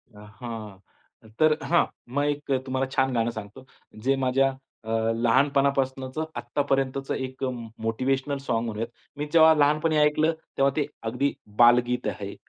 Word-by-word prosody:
हां. 105 -1 -9 0.6
तर 155 -1 +4
हां, 170 +4 +3 0.3
मग 145 +1 +1
एक 145 -1 -2
अ, 135 - +4
तुम्हाला 130 0 -1
छान 135 -1 +1
गाणं 115 -1 +1
सांगतो 110 +3 -9 0.4
जे 135 +1 +3
माझ्या 135 +1 +3 0.4
अ, - - -7 0.3
लहानपणापासूनच 135 +2 +1 0.2
आत्तापर्यंतचं 135 +1 -1
एक 130 0 -5
अ, 130 - +1 0.3
मोटिव्हेशनल 135 +5 -1
सॉंग 120 -4 -2
म्हणूयात. 115 0 -3 0.3
मी 150 - -2
जेव्हा 160 -1 +7
लहानपणी 150 +2 +2
ऐकलं, 150 +2 +3 0.3
तेव्हा 135 0 +3
ते 150 -2 +1 0.2
अगदी 135 +4 0 0.3
बालगीत 120 +1 +4
आहे, - - -5
135 Hz, 140 wpm, -26 LUFS, 120-145 Hz, 0.6 s, जेव्हा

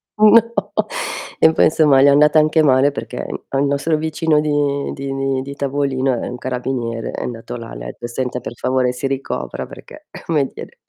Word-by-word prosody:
no, 225 +2 +4 0.7
e 160 - +6
poi - - +3
insomma 150 -4 +4
le 140 - +6
è - - +7
andata 150 +2 +5
anche 155 +1 +3
male 135 0 +4
perché - - -6 0.2
al 135 +1 +1
nostro 140 +3 0
vicino 160 0 +1
di 145 -2 0
di 135 0 -5
di 135 -1 -1
di 140 +1 -7
tavolino 135 -1 0
è - - -4
un 125 - -6
carabiniere, 125 -2 -3
è - - -5
andato 120 0 -6
là, 115 -1 -9
le - - -8
ha - - -4
etto: 120 - -7
"Senta 125 +1 -3
per 120 - -7
favore 130 0 0
si 125 +2 -3
ricopra 135 0 -4
perché, 305 0 -13 0.2
come 150 -4 +1
dire" - - -10
140 Hz, 195 wpm, -19 LUFS, 130-150 Hz, 0.7 s, è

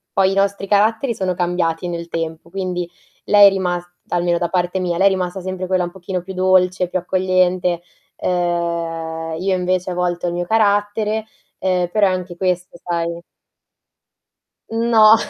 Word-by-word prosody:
poi 195 0 +4
i - - -1
nostri 195 0 +1
caratteri 220 +5 +2
sono 190 -3 -1
cambiati 175 -1 -1
nel 170 0 -4
tempo, 165 0 -4
quindi 180 -2 -3 0.4
lei 205 -1 +8
è - - +8
rimas 180 -2 -1 0.3
almeno 175 0 +1
da 175 - 0
parte 180 +1 0
mia, 175 -2 -1
lei 195 +2 +5
è - - +6
rimasta 185 0 -2
sempre 185 0 -4
quella 185 -1 +1
un 175 - -4
pochino 180 0 -4
più 190 +2 -8
dolce, 185 -1 +3
più 185 - -1
accogliente, 185 -1 +1 0.4
uhm, 170 -2 -2
io 190 +1 +1
invece 180 0 -1
a - - -2
volte 175 0 -1
ho - - +1
il 175 - -4
mio 175 0 -2
carattere, 210 +1 +1 0.3
uhm, 180 -2 +1
però 205 -1 +4
è - - +1
anche 180 -1 -4
questo 180 -1 -1
sai. 170 0 -2 1.5
No. 225 -1 +6
180 Hz, 170 wpm, -19 LUFS, 175-190 Hz, 1.5 s, lei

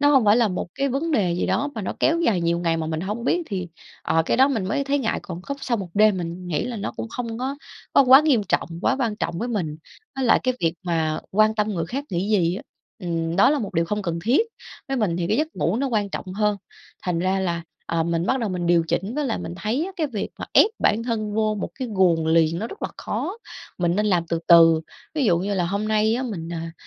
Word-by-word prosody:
Nó 290 - +4
hông 270 -5 +5
phải 210 +1 +5
là 235 -2 +3
một 180 -2 -3
cái 275 0 0
vấn 280 +6 -1
đề 200 - +2
gì 175 - -1
đó 290 - 0
mà 220 - -4
nó - - -2
kéo 330 +1 +3
dài 225 - +2
nhiều 170 0 +1
ngày 165 -1 0
mà 160 -1 -2
mình 160 0 -2
hông 210 +6 -4
biết 350 +6 +1
thì, 185 -4 -4 0.3
ờ, 165 - +2
cái - - +2
đó 265 +2 +5
mình 230 -9 -1
mới 215 +9 -1
thấy 285 +1 +1
ngại, 230 -5 -1
còn 175 -1 -7
cốc 280 +7 -5
sau 240 -3 0
1 195 -4 -5
đêm 210 -2 +4
mình 175 +1 -5
nghĩ 155 -4 -1
là 245 -1 -4
nó 200 - -4
cũng - - -5
không 230 -1 -5
có 265 +3 -3 0.4
có - - +7
quá 265 +1 +8
nghiêm 285 -8 +3
trọng, 180 - 0
quá 265 - +2
quan 230 -5 -1
trọng 170 - -3
với 240 - -2
mình. 175 -10 -2 0.4
Với 270 - -1
lại 230 - +4
cái 255 0 +1
việc 165 -1 +1
mà 160 -3 -1
quan 215 +2 +3
tâm 210 -1 0
người 170 -5 -2
khác 270 +10 -4
nghĩ 180 +3 -1
gì 180 -5 +2
á, 225 - -7 0.4
ừm, 165 -3 -2
đó 200 - +6
là 300 - +2
một 215 -6 -5
điều 165 - +2
không 210 +4 -2
cần 170 -3 -2
thiết, 250 - +4 0.5
với 270 - -1
mình 205 -8 0
thì 175 -1 -1
cái - - +2
giấc 310 +2 +1
ngủ 175 +6 0
nó 275 +3 0
quan 210 -4 0
trọng 185 -1 -5
hơn. 210 0 +1 0.5
Thành 180 -2 -1
ra 185 +2 +1
là, 170 -3 -1 0.2
ờ, 165 0 0
mình 170 +1 -1
bắt 265 +4 +1
đầu 225 - -1
mình 180 -1 -2
điều 170 -1 +4
chỉnh, 195 +8 -1
với 295 0 -1
lại 230 - -1
mình 170 - -6
thấy 225 - -1
á 390 - -7
cái 320 -4 0
việc 230 -8 -4
mà - - -4
ép 435 - +6
bản 220 +2 +2
thân 215 -3 -2
vô 215 0 +1
một - - -2
cái 260 -2 -4
guồng 170 -4 +3
liền 165 0 +3
nó 220 - -3
rất 400 - -11
là - - -1
khó, 385 - -3 0.4
mình 175 0 +1
nên 210 +1 +1
làm 175 -4 +1
từ 165 0 -1
từ. 165 -1 +7 0.3
Ví 300 -3 +1
dụ 175 -7 +3
như 200 +3 -2
là 180 -2 +1
hôm 200 +4 -2
nay 215 +1 +2
á 250 - -1
mình, 195 -10 -5
à, 165 0 -5
205 Hz, 275 wpm, -23 LUFS, 170-245 Hz, 0.5 s, quá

